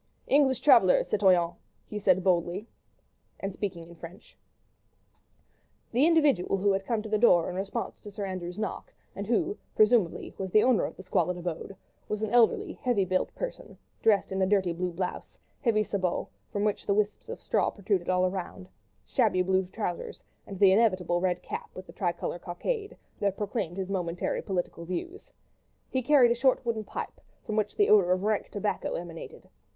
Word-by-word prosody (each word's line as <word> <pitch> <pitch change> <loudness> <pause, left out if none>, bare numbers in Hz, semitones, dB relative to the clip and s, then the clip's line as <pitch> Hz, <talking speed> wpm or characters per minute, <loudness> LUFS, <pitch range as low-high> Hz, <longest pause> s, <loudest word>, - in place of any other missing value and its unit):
"English 270 -2 +3
travellers, 235 -10 +5
citoyen!" 180 -4 +3 0.3
he 210 - -5
said 190 -2 +3
boldly, 180 +3 0 0.7
and 195 0 -4
speaking 180 -5 -4
in 170 +1 -13
French. 170 +2 -12 1.6
The 260 +7 +4
individual 295 - +3
who 200 +1 +2
had 195 0 -1
come 225 -3 0
to - - -6
the 215 0 0
door 180 -7 +5
in - - -7
response 195 +1 -4
to 210 - -9
Sir 200 0 -5
Andrew's 185 -1 -5
knock, 215 -1 -4 0.2
and 200 +1 -5
who, 340 - 0 0.2
presumably, 215 -5 +3
was 190 -1 -3
the 215 +3 +5
owner 250 -4 +3
of - - -7
this 190 - -11
squalid 180 -1 0
abode, 175 +2 -5 0.3
was 210 0 -2
an 220 - -2
elderly, 245 - +3
heavily 240 -8 0
built 185 0 -1
peasant, - - -6 0.2
dressed 210 -3 +3
in 190 0 -1
a 190 - +3
dirty 190 -3 +2
blue 180 +1 -2
blouse, 180 +1 -5 0.2
heavy 220 -4 +2
sabots, 190 -4 -2 0.2
from 205 - -1
which 210 -1 -1
wisps 205 +1 0
of - - -6
straw - - +1
protruded 195 -3 -2
all 185 0 +3
round, 180 - -6 0.4
shabby 185 0 +2
blue 190 0 +1
trousers, 180 -3 -4 0.3
and 195 - -7
the 195 0 +6
inevitable 185 -5 +2
red 180 -1 0
cap - - -6
with 185 - -8
the - - -13
tricolour 175 -1 -2
cockade, 410 - -4 0.2
that 200 -2 0
proclaimed 200 -4 -3
his 190 0 -3
momentary 175 -2 -2
political 175 -3 -3
views. 345 - -6 0.6
He 260 - 0
carried 255 -2 +5
a - - +5
short 260 +1 +2
wooden 225 -2 -2
pipe, - - -6 0.2
from 215 - -3
which 210 -1 0
the 410 - +3
odour 185 -4 +6
of 185 +1 -2
rank 215 0 0
tobacco 205 0 -2
emanated. 170 -1 -8
195 Hz, 175 wpm, -28 LUFS, 180-220 Hz, 1.6 s, the